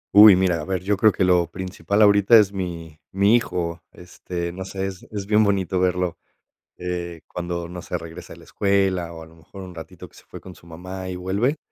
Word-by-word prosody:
Uy, 105 -1 +10
mira, 90 -3 +1
a - - -7
ver, 95 -1 -3
yo 100 +2 +1
creo 110 +2 +4
que 95 - -1
lo 90 -2 +3
principal 95 +3 -1
ahorita 100 +2 +6
es 100 -2 +3
mi 85 -5 -6
mi 100 +4 +4
hijo, 85 -7 -1
este, 90 -1 -6
no 95 +1 -6
sé, 95 0 -4
es 95 -1 -6
es 100 -2 -5
bien 105 +1 +3
bonito 95 -2 0
verlo, 90 -1 0 0.6
eh, 85 -2 -5
cuando, 85 -1 -5
no 90 -1 -8
sé, - - -4
regresa 85 +2 -10
de - - -14
la - - -16
escuela, 95 -4 0
o 80 - -10
a 80 - -11
lo 80 - -19
mejor 85 +4 -13
un 90 -1 -10
ratito 80 -2 -10
que - - -24
se - - -16
fue - - -11
con 95 -1 -12
su - - -19
mamá 90 +3 -8
y 90 - -5
vuelve, 100 - 0
90 Hz, 225 wpm, -22 LUFS, 85-100 Hz, 0.6 s, Uy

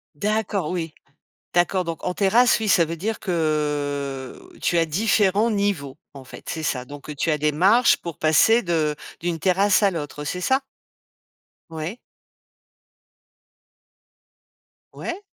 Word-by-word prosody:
D'accord, 205 -3 -1
oui, 165 -3 -3 0.6
d'accord. 175 +1 +2
Donc 165 -1 -5
en 180 - -1
terrasse, 225 +5 +4
oui, 215 - -1
ça 170 -4 +5
veut 165 +1 -5
dire 215 +6 -3
que 145 -5 -2
tu 175 - +1
as 165 - +4
différents 205 +4 +2
niveaux, 195 -10 -1 0.2
en 135 -2 -11
fait, - - -12
c'est 160 - -4
ça. 125 -4 -2
Donc 145 +2 -9
tu 160 - 0
as 150 - +1
des 150 0 +1
marches 205 +10 +4
pour 170 -3 -8
passer 220 +9 +4
de 160 -4 0 0.3
d'une 170 -1 -2
terrasse 195 +4 +3
à 200 - +4
l'autre, 150 -3 -6
c'est 180 +5 -3
ça? 265 +6 +2 1.1
Ouais. 165 +8 -5 3.0
Ouais. 350 +3 -5
170 Hz, 135 wpm, -23 LUFS, 150-200 Hz, 3.0 s, ça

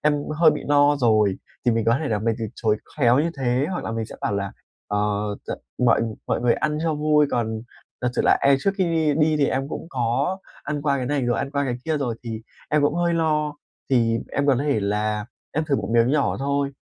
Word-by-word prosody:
em 150 0 +3 0.2
hơi 160 0 +6
bị 150 - -4
no 145 0 +4
rồi." 110 -6 +3 0.3
Thì 120 - +3
mình 115 -1 0
có 115 +3 +3
thể 150 - -2
là 110 - 0
mình 115 +2 0
từ 115 - -2
chối 110 -2 +1 0.2
khéo 125 -3 +4
như 165 +3 +1
thế, 130 +1 +1
hoặc 180 - -3
là - - -3
mình 115 0 -2
sẽ - - -10
bảo - - -1
là: 100 -1 -2 0.4
ờ, 105 - 0 0.5
t - - -3 0.3
"Mọi 125 -2 +4 0.3
mọi - - 0
người 120 -1 +3
ăn 150 0 -1
cho 165 -2 +1
vui, 150 0 +3
còn 110 -2 -1 0.4
thật 125 - +2
sự - - +1
là - - +4
em 140 0 +5
trước 195 - +2
khi 190 - +3
đi 160 -3 +1
đi 155 0 +3
thì 145 -2 +3
em 135 +1 -1
cũng 160 - -6
có 130 +9 0 0.2
ăn 150 -1 -3
qua 140 -2 +2
cái 130 -2 -2
này 145 0 0
rồi, 120 -1 +1
ăn 135 - -2
qua 140 0 0
cái 125 -3 -2
kia 160 -1 0
rồi 130 -5 -1
thì 115 -2 -5 0.3
em 150 -1 +3
cũng 145 +1 +2
hơi 170 0 +1
lo, 150 -2 +1 0.4
thì 115 -3 +3
em 140 - 0
có 140 -3 +4
thể 140 -6 +1
là 105 +1 -1 0.3
em 155 - 0
thử 145 -3 +1
một - - -3
miếng 115 +1 +4
nhỏ 145 -1 +1
thôi." 140 +1 0
140 Hz, 245 wpm, -23 LUFS, 115-150 Hz, 0.5 s, hơi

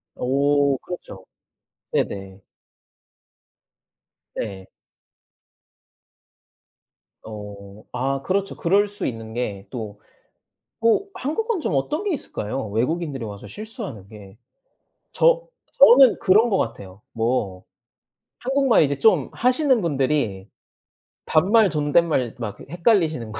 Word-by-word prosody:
오 140 +1 +2
그렇죠. 100 - -9 0.7
네네. 95 -1 -3 1.9
네. 95 -3 -5 2.6
어. 105 -1 -10
아 135 +2 -2
그렇죠. 195 +1 -1
그럴 200 +4 +2
수 205 - -6
있는 115 -2 -6
게 100 -5 -4
또 105 -4 -7 0.8
오 230 - +2
한국은 415 - -2
좀 185 - -2
어떤 300 - -1
게 400 -4 -1
있을까요, 120 - -4
외국인들이 135 +3 -2
와서 100 -1 -9
실수하는 140 - -8
게? 105 -2 -13 0.7
저 - - +3 0.3
저는 265 -2 +7
그런 215 +5 +4
것 195 - +2
같아요. 100 - -5
뭐 110 -5 -2 0.8
한국말 265 -3 +3
이제 140 -2 0
좀 180 - +3
하시는 255 0 +2
분들이 135 - -1 0.8
반말 200 +6 +4
존댓말 150 -4 +1
막 105 -4 -4
그 - - -13
헷갈리시는 165 - +1
거. 110 - -6
140 Hz, 200 characters per minute, -22 LUFS, -, 2.6 s, 저는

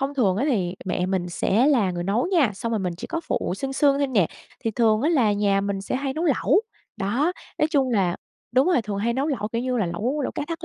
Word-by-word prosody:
Thông 275 +1 -2
thường 200 -9 +2
á 240 - 0
thì 185 -8 0
mẹ 180 -1 -1
mình 185 -2 -1
sẽ 210 +7 +2
là 235 -11 +3
người 175 -1 -4
nấu 215 - +1
nha, 295 - +4
xong 230 +4 -4
rồi 220 - +1
mình 180 -3 -2
chỉ - - -7
có 330 0 -3
phụ - - -1
sương 270 +3 -4
sương 280 0 +3
thôi 280 - +2
nè. 205 -11 +2 0.3
Thì 225 - -1
thường 220 0 +2
á 300 - +2
là 240 -10 +3
nhà 200 -1 +2
mình 200 -1 -2
sẽ 200 +6 -3
hay 270 0 -2
nấu 325 +3 -2
lẩu, 310 - +3 0.3
đó, 240 - 0 0.3
nói 305 - +2
chung 270 -5 +2
là 190 -6 +1 0.4
đúng 260 +4 +4
rồi, 345 -10 +3
thường 205 -2 -4
hay 235 +3 0
nấu 270 +4 -1
lẩu, 220 -8 -2
kiểu 230 +2 -2
như 255 -1 -1
là 205 - +1
lẩu 235 - -2
lẩu - - -2
cá - - -3
thác 330 +1 -5
235 Hz, 270 wpm, -24 LUFS, 200-275 Hz, 0.4 s, nha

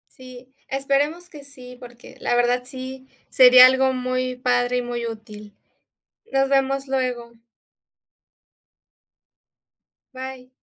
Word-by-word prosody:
Sí, 255 0 -14
esperemos 280 +6 -2
que 295 -3 -13
sí, 250 -3 -13
porque 240 -1 -14
la - - -1
verdad 245 +1 +1
sí 260 0 -9 0.2
sería 255 0 +8
algo 265 0 +1
muy 255 0 -3
padre 250 -1 0
y - - 0
muy 240 -1 -5
útil. 215 -2 -10 0.8
Nos 270 0 +1
vemos 275 0 0
luego. 250 -3 -3 2.8
Bye. 260 -1 -9
255 Hz, 105 wpm, -22 LUFS, 245-265 Hz, 2.8 s, sería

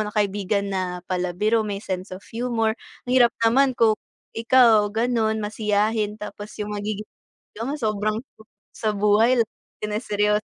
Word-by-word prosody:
ng 210 - -10
kaibigan 200 0 0
na 180 -2 -3
palabiro 185 +5 0
may 210 -2 -2
sense 185 +1 -4
of 185 +2 -9
humor, 230 -1 0 0.3
mahirap 245 -1 +4
naman 260 +3 +4
kung 225 -1 +5 0.4
ikaw 230 -2 +5
gano'n 220 0 +1
masiyahin 210 0 0
tapos 210 0 -8
yung 210 -1 -4
magiging 210 0 -3 0.5
jowa 230 +6 -3
mo - - -2
sobrang 215 -2 0 0.6
sa 215 - 0
buhay 210 +4 +3
lagi 230 - +4 0.4
lang 210 +3 -3
seryo 210 0 +1
215 Hz, 145 wpm, -23 LUFS, 205-225 Hz, 0.6 s, kung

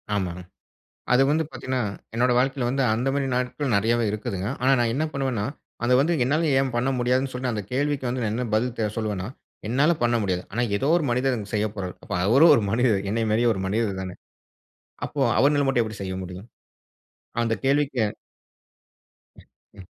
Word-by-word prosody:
ஆமாங்க. 90 -2 -2 0.7
அது 130 - +5
வந்து 160 +1 +2
பார்த்தீங்கன்னா, 130 0 -3 0.3
என்னுடைய 125 +1 +2
வாழ்க்கையில 130 -1 +1
வந்து 135 +1 0
அந்த 120 +4 -1
மாதிரி 140 -1 0
நாட்கள் 125 0 -1
நிறையவே 115 +3 +2
இருக்குதுங்க. 100 -2 -3
ஆனா 130 +2 +4
நான் 115 -1 +2
என்ன 155 +2 0
பண்ணுவேன்னா? 130 -7 -1 0.4
அத 125 +1 +3
வந்து 165 +5 +2
என்னால 155 +5 +1
ஏன் 135 -2 0
பண்ண 125 +3 +1
முடியாதுன்னு 130 +2 +1
சொல்லிட்டு 125 -1 -2
அந்த 105 -2 -3
கேள்விக்கு 140 -1 0
வந்து 125 0 -2
நான் 105 0 -1
என்ன 125 +1 -2
பதில் 120 +2 0
தே 110 - +1
சொல்லுவேன்னா 105 -3 -2 0.4
என்னால 140 +8 +3
பண்ண 120 0 +2
முடியாது. 90 -2 -1
ஆனா 120 +4 -1 0.2
ஏதோ 135 - -1
ஒரு 165 - -1
மனிதன் 125 -2 0
செய்யப்போறாரு. 105 -3 -2 0.3
அவரும் 140 +9 +7
ஒரு 110 - +1
மனிதர் 110 -4 +2
என்னை 115 +1 0
மாதிரியே 120 +2 +3
ஒரு 95 - -4
மனிதர் 100 -2 -1
தானே. 95 -1 -6 0.9
அப்போ - - -5 0.2
அவர்னால 145 0 +3
மட்டும் 125 -3 +3
எப்படி 110 -2 -7
செய்ய 95 -1 -4
முடியும்? 90 +4 -8 1.0
அந்த 115 -1 +1
கேள்விக்கு 135 -3 +2 1.4
ம். - - -19 0.3
ம். 95 - -11
120 Hz, 170 wpm, -24 LUFS, 105-135 Hz, 1.4 s, அவரும்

